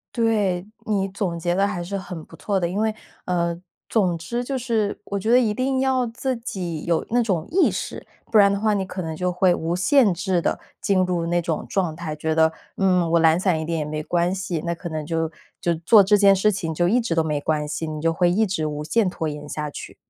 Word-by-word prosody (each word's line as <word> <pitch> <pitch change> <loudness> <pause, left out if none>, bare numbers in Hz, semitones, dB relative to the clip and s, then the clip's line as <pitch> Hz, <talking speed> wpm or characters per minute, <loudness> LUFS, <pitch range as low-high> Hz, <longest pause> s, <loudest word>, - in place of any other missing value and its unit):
对， 210 -6 +1 0.2
你 200 -3 0
总 190 -3 -3
结 175 +1 -1
得 195 +2 +2
还 185 -4 -3
是 200 +3 -4
很 180 -4 -7
不 - - -14
错 200 -2 -1
的。 175 - 0
因 180 +3 -4
为， 220 0 +1 0.3
呃， 170 -1 0 0.3
总 185 -6 +1
之 235 +9 -3
就 270 +1 -3
是， 230 -5 -1
我 200 - -3
觉 215 - -2
得 245 +2 +6
一 225 -4 +1
定 260 +3 0
要 260 -2 +1
自 255 +3 -2
己 180 -8 -5
有 170 -1 +1
那 245 +1 +3
种 185 -8 -1
意 365 +2 +4
识， - - -5 0.3
不 220 - +5
然 200 -1 +7
的 200 - -1
话 215 0 +2
你 200 -2 0
可 185 0 -5
能 160 -1 -4
就 180 +2 -1
会 180 0 +3
无 165 0 -2
限 235 +4 +4
制 180 0 0
地 - - -1 0.2
进 185 -2 +2
入 175 -2 -1
那 175 +1 +1
种 160 -1 -2
状 180 -5 0
态， 160 -2 -5
觉 160 +1 -1
得， 160 0 +4 0.3
嗯， 180 -3 +2
我 170 - +4
懒 160 +1 +4
散 185 -4 +1
一 - - -3
点 165 +1 -2
也 150 - -2
没 155 +1 -3
关 175 +3 0
系， 185 -4 -3
那 170 - 0
可 170 +1 -7
能 155 -2 -4
就 165 0 -1 0.3
就 170 -1 +1
做 185 +6 +6
这 205 +2 +4
件 200 -1 +6
事 210 +3 +3
情 175 -5 -3
就 175 +2 +1
一 245 +5 +3
直 225 -7 -1
都 165 -1 +2
没 150 -2 -1
关 150 0 -1
系， 160 +2 -3
你 155 -1 -5
就 165 +1 +2
会 175 +1 +2
一 215 +4 +2
直 170 -5 -2
无 150 0 -3
限 210 +7 +1
拖 165 -2 -3
延 150 0 -7
下 150 0 -4
去。 - - -9
180 Hz, 270 characters per minute, -23 LUFS, 165-205 Hz, 0.3 s, 然